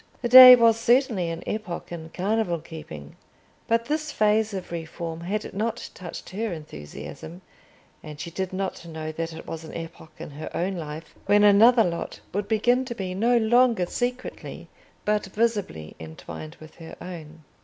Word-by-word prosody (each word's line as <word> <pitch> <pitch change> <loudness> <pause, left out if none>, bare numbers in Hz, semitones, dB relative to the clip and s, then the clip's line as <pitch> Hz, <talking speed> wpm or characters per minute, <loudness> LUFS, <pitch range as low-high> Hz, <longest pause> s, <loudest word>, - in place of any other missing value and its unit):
The 240 - 0
day 255 0 +12
was 230 -2 +4
certainly 230 -7 +2
an 165 0 -5
epoch 210 -7 -5
in 160 -2 -7
carnival 190 0 -1
keeping; 155 - -10 0.5
but 230 0 +1
this 305 +3 -2
phase 215 -1 +2
of 190 -3 -6
reform 165 0 -6
had 205 +5 -4
not 225 +3 -3
touched 175 -2 -9
her 215 +3 -3
enthusiasm: 155 - -9 0.6
and 150 -2 -10
she 170 - -6
did 190 +2 -3
not 190 -1 -4
know 160 -1 -6
that 165 +1 -4
it 160 - -10
was 165 0 -7
an 160 - -10
epoch 165 -1 -9
in - - -8
her 150 +2 -7
own 190 +3 -1
life 155 -1 -7
when 205 +1 +5
another 225 +4 +6
lot 170 -3 -4
would 205 +1 -2
begin 240 +4 +2
to 240 -2 -6
be 185 -4 -4
no 235 +6 +2
longer 235 -3 +3
secretly 245 +6 -5 0.4
but 210 -1 0
visibly 205 - -2
entwined 80 0 -9
with 155 0 -14
her 165 -1 -10
own. 165 -3 -10
185 Hz, 165 wpm, -25 LUFS, 165-225 Hz, 0.6 s, day